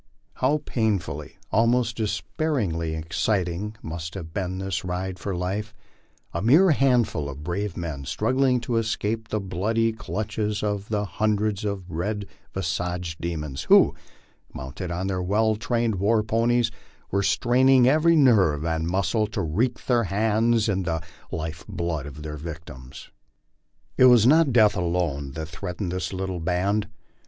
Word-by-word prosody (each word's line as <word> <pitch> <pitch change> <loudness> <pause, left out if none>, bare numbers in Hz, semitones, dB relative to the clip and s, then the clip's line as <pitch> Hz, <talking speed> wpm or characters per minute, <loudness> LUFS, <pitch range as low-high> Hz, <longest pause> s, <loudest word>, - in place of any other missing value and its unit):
How 145 +4 +1
painfully, 95 - -2
almost 115 +1 +2
despairingly 105 - -1
exciting 90 +4 -1
must 80 +1 -6
have 80 -4 -7
been 95 -1 -2
this 95 -4 -3
ride 90 0 -3
for 95 +1 -3
life! 100 +5 -3 0.6
A - - -2
mere 155 - +6
handful 125 - +2
of 70 +2 -8
brave 90 +3 -3
men 80 -5 -4
struggling 130 - +1
to 120 -1 -1
escape 110 0 -1
the 110 - -1
bloody 110 +5 0
clutches 105 +1 -3
of 105 -1 -2
the 105 -1 0
hundreds 105 0 0
of 100 -3 -3
red 100 +5 -2 0.3
visaged 90 -2 -3
demons, 75 -5 -4
who, - - +6 0.6
mounted 70 +7 -6
on 90 +2 -2
their 95 -1 -1
well 110 +4 +2
trained 115 0 0
war 105 +3 +2
ponies, 115 +1 +2 0.4
were 100 - +2
straining 125 +4 +4
every 155 +4 +4
nerve 100 - +4
and 80 0 -1
muscle 100 +4 +1
to 105 - -3
reek 110 +11 -1
their 120 -3 +2
hands 110 +3 +2
in 95 -3 +1
the 85 -2 -1 0.3
life 80 0 -4
blood 85 -4 -3
of 75 +1 -9
their 75 -1 -5
victims. 75 -5 -9 0.9
It 130 - +7
was 120 -3 +7
not 155 +2 +5
death 110 -3 +5
alone 85 -6 -1
that 80 +1 -5
threatened 90 +2 -5
this 90 0 -3
little 95 -1 -3
band. 95 +5 0
100 Hz, 145 wpm, -25 LUFS, 85-115 Hz, 0.9 s, It